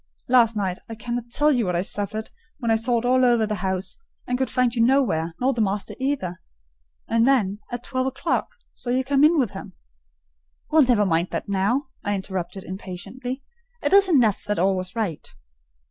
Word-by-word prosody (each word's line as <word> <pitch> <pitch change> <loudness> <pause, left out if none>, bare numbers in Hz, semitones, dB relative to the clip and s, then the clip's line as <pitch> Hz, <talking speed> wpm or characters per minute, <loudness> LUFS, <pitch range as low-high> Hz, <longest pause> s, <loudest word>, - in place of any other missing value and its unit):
Last 235 -3 +4
night 190 -3 -2
I 225 - -5
cannot 240 +1 -4
tell 295 +5 +3
you 240 -7 +1
what 180 - 0
I 175 - +1
suffered 210 +2 -4 0.3
when 235 -4 -1
I - - +5
sought 235 +1 0
all 255 +1 +4
over 240 -3 +4
the 215 - -2
house, 190 -1 -2 0.3
and 250 - -1
could 260 +1 -1
find 250 -2 +1
you 235 - 0
nowhere, 205 -11 +2
nor 260 +2 +2
the 235 - -1
master 200 -1 -1
either; 260 -10 -2 0.7
and 230 +1 +3
then, 210 -7 +2
at 245 0 -4
twelve 255 -1 -1
o'clock, 275 +5 -1 0.3
saw 240 - -7
you 255 +2 +2
come 275 +1 +2
in 320 +2 +6
with 250 -8 +1
him." - - -9 1.0
"Well, 315 0 +6
never 240 -6 +4
mind 170 -1 +1
that - - -4
now," 205 +8 0
I 205 - 0
interrupted 190 -1 -4
impatiently; 225 +8 -6 0.4
"it - - +1
is 395 -1 +7
enough 240 - +3
that 210 - -1
all 190 +2 +2
was 185 +1 -5
right." 205 -9 -3
230 Hz, 190 wpm, -24 LUFS, 195-255 Hz, 1.0 s, is